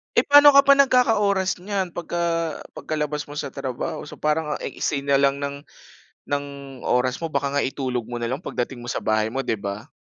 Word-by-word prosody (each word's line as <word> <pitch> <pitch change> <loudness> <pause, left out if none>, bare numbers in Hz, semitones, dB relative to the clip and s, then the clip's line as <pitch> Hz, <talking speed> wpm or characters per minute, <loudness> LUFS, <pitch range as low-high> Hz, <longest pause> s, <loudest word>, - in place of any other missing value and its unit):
Eh, - - +4
pa'no 290 0 +9
ka 280 - +7
pa 280 - +8
nagkaka-oras 220 -8 +3
niyan? 195 -3 -3
'Pag 175 - -6
ka, 175 0 0 0.5
pagkalabas 150 -1 -3
mo - - -7
sa 140 - -3
trabaho 130 -2 -5
so 150 - -11
parang 150 0 0
ang - - -5
iksi 145 - -2
na 140 - +4
lang 140 0 +2
ng 140 0 -5 0.6
ng 145 0 -1 0.4
oras 125 +5 0
mo 160 - -3
baka 140 0 -1
nga 145 - +2
itulog 130 -3 -2
mo 120 +1 -6
na 120 - -2
lang 135 +8 -4
pagdating 120 0 -4
mo 120 - -4
sa - - -2
bahay 110 0 0
mo, 135 - -3
'di 115 - +1
ba? 100 +5 -6
140 Hz, 210 wpm, -23 LUFS, 125-175 Hz, 0.6 s, pa'no